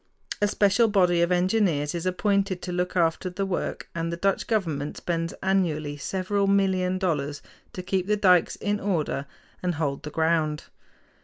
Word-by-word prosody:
A 205 - +4
special 205 +3 +3
body 180 -5 +3
of 170 +1 +2
engineers 180 -5 +1
is 170 +1 -3
appointed 195 0 +1
to 180 - -4
look 180 +1 -2
after 170 +2 +1
the 190 +2 -3
work, 190 -2 -3
and 165 0 -2
the 170 - -3
Dutch 195 +2 0
government 160 -10 -1
spends 165 -1 -2
annually 165 -6 0
several 195 +6 -1
million 190 -2 +2
dollars 150 -6 -2 0.3
to 185 - -6
keep 185 0 -1
the 210 0 +2
dikes 180 -4 +4
in 205 0 -2
order 155 -8 -1 0.3
and 180 -2 -1
hold 145 -3 -2
the 150 - -6
ground. 160 -1 0
180 Hz, 165 wpm, -26 LUFS, 165-195 Hz, 0.3 s, A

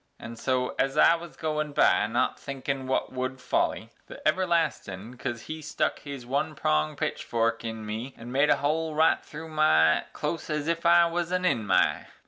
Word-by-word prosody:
An' 115 +1 -8
so 125 +2 0
ez 135 +2 +1
I 165 - +7
wuz 170 0 -6
goin' 155 -2 -2
by, 105 - +4
not 115 +3 0
thinkin' 135 -1 -4
wut 130 - -1
would 130 +1 -3
folly, - - -1 0.2
The - - -10
everlastin' 155 - 0
cus 120 -2 -4
he 155 0 -7
stuck 150 - -1
his 140 -4 -8
one 145 +5 -1
pronged 75 - 0
pitchfork 115 0 -1
in 110 -1 -5
me 110 +5 -5
An' 120 +2 -9
made 140 +3 +3
a - - +6
hole 155 +2 -1
right 160 +1 +3
thru 160 +2 -9
my 80 - +3
close 155 +3 -4
ez 150 0 -2
ef 170 0 0
I 170 0 +7
was 170 +1 -2
an 185 0 0
in'my. 110 - +2
140 Hz, 180 wpm, -27 LUFS, 115-160 Hz, 0.2 s, I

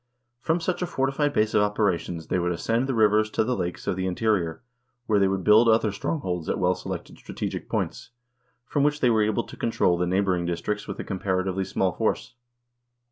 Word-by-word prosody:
From 165 +6 0
such 175 +2 -2
a 180 - 0
fortified 135 +1 0
base 110 -3 +1
of - - +4
operations 95 -5 0
they 90 - 0
would 90 0 0
ascend 115 +8 0
the 135 - -1
rivers 110 0 +4
to - - +1
the 125 +3 0
lakes 90 -4 -4
of - - 0
the 95 0 -2
interior, 90 -3 0 0.4
where 105 -3 +2
they 100 - +4
would 95 -1 -1
build 110 +4 +6
other 110 -1 +3
strongholds 95 - -3
at - - 0
well - - +2
selected - - -7
strategic - - -5
points, - - -3 0.6
from 145 - -1
which 150 +1 +2
they 125 -4 +3
were 110 -1 +3
able 110 +2 +1
to - - -11
con - - -2
trol 90 -6 +2
the 90 - +1
neighboring 90 -2 +1
districts 90 +5 -3
with 100 - -6
a - - -3
comparatively 95 0 -1
small 95 0 0
force. 110 +6 -2
105 Hz, 205 wpm, -25 LUFS, 90-115 Hz, 0.6 s, build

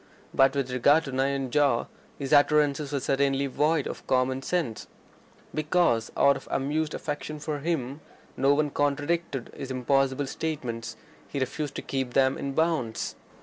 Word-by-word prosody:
But 135 +1 +4
with 135 -2 -1
regard 140 +5 +4
to 135 - -6
Nayanjore 135 -1 +1 0.3
his 140 0 -2
utterances 145 0 +4
were 140 - 0
certainly 135 +1 +1
void 150 +2 +1
of - - -7
common 130 0 +1
sense. 145 -7 -2 0.7
Because, 150 -7 +1
out 140 - +5
of - - -9
amused 150 +3 -1
affection 150 0 -4
for 150 0 -3
him, 145 -2 -2 0.3
no 135 +2 +3
one 150 -1 +1
contradicted 145 -1 -1
his 135 - -6
impossible 135 +2 +1
statements, 120 -7 -4 0.3
he 140 - -4
refused 135 +2 -3
to - - -4
keep 130 -2 -3
them 130 0 +4
in 140 0 -4
bounds. 160 -8 0
140 Hz, 150 wpm, -27 LUFS, 130-150 Hz, 0.7 s, out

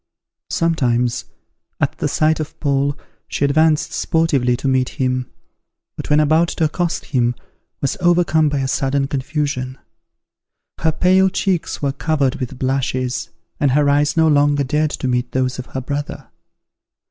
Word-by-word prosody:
Sometimes, 125 - 0 0.5
at - - -1
the - - 0
sight 155 +1 +1
of 155 +1 -6
Paul, 140 -1 0 0.3
she 140 - 0
advanced 155 +2 +2
sportively 140 -7 +1
to 135 - -3
meet 130 -1 +2
him; 130 -1 0 0.7
but, - - -7
when 150 0 +4
about 155 +3 +3
to 165 - -2
accost 170 +2 -1
him, 125 -3 0 0.5
was 140 +9 -1
overcome 170 -3 +3
by 140 -1 -1
a 135 - -1
sudden 135 +1 0
confusion; 135 -2 -3 1.0
her 160 - +2
pale 185 +3 +3
cheeks 185 -5 -1
were 140 - +1
covered 140 -3 0
with 130 0 -5
blushes, 130 -3 -1 0.3
and 140 -3 +2
her 145 0 +3
eyes 145 +2 +1
no 160 0 +5
longer 145 -1 +3
dared 150 +3 0
to 130 - -4
meet 125 -1 -1
those 130 0 0
of 130 - -6
her 130 - -5
brother. 145 +3 -5
140 Hz, 150 wpm, -19 LUFS, 130-155 Hz, 1.0 s, no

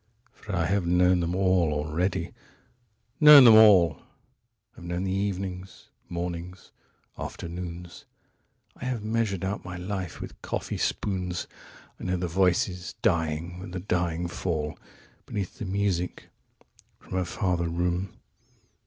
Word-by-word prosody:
49For 105 -2 -4
I 85 -2 +1
have 95 -1 0
known 90 +1 +4
them 85 +1 -1
all 90 -4 +2
already, 80 +4 -2 0.9
known 150 -2 +10
them 115 - +9
all:50Have 105 - +2
known 85 +1 -3
the 95 - -1
evenings, 95 -1 -4 0.2
mornings, 85 +1 -6 0.5
afternoons,51I 85 0 -10
have 120 -4 -2
measured 110 -4 -1
out 100 +1 -3
my 90 0 -7
life 90 -1 -5
with - - -9
coffee - - -4
spoons;52I 90 -3 -4
know 90 0 0
the 90 0 -2
voices 90 +1 0
dying 85 -3 0
with 90 0 -8
a - - -2
dying 85 -2 -1
fall53Beneath 85 +3 -6
the - - -4
music 95 -2 -2 0.7
from - - -13
a - - +1
farther 85 -1 -1
room. 90 +2 -1
90 Hz, 120 wpm, -27 LUFS, 85-95 Hz, 0.9 s, known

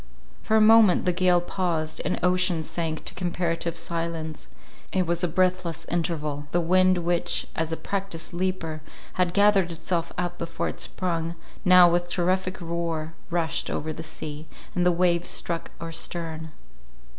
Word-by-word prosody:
For 220 - +2
a - - +5
moment 220 -3 +6
the 180 - +2
gale 180 0 +4
paused, 170 -4 -2
and - - -1
ocean 180 -2 +2
sank 160 -1 -3
to - - -2
comparative 170 -2 -2
silence—it 165 +2 -4
was 170 0 0
a - - +3
breathless 180 -1 0
interval; 155 -4 -2
the 175 - +2
wind 185 +2 +4
which, 175 0 +1
as 160 0 -1
a 160 - -2
practised 195 -5 -4
leaper, 175 -3 -2 0.3
had 180 -1 +1
gathered 200 -2 +4
itself 170 0 -2
up 175 -1 -3
before 165 0 -2
it - - -8
sprung, 170 -2 -1 0.3
now 180 -2 +8
with 175 0 +1
terrific 185 +1 0
roar 165 -2 -3 0.2
rushed 165 -1 -1
over 155 +1 -3
the 160 - -7
sea, 155 -1 -7 0.3
and 180 0 +2
the - - +5
waves 175 0 +2
struck 170 -1 -2
our 165 0 -6
stern. 160 -1 -4
170 Hz, 155 wpm, -26 LUFS, 165-180 Hz, 0.3 s, now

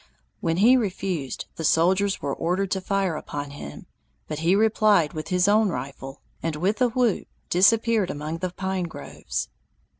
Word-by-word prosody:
When 165 0 -1
he 230 +7 +6
refused, 185 - -3
the 165 - -4
soldiers 190 +5 +2
were 140 - -1
ordered 185 +3 -1
to 190 - 0
fire 195 -3 0
upon 145 -1 -6
him, 145 - -9 0.4
but 155 -1 -4
he 170 +4 +3
replied 210 -6 +3
with 155 0 -5
his 180 +1 +2
own 210 0 +4
rifle, 135 -3 -6 0.2
and 165 -2 -2
with 195 +9 -1
a 250 - +5
whoop 240 -4 0 0.2
disappeared 215 +2 +4
among 155 +3 -4
the 185 +1 -2
pine 190 0 -3
groves. 165 - -5
185 Hz, 160 wpm, -25 LUFS, 160-205 Hz, 0.4 s, he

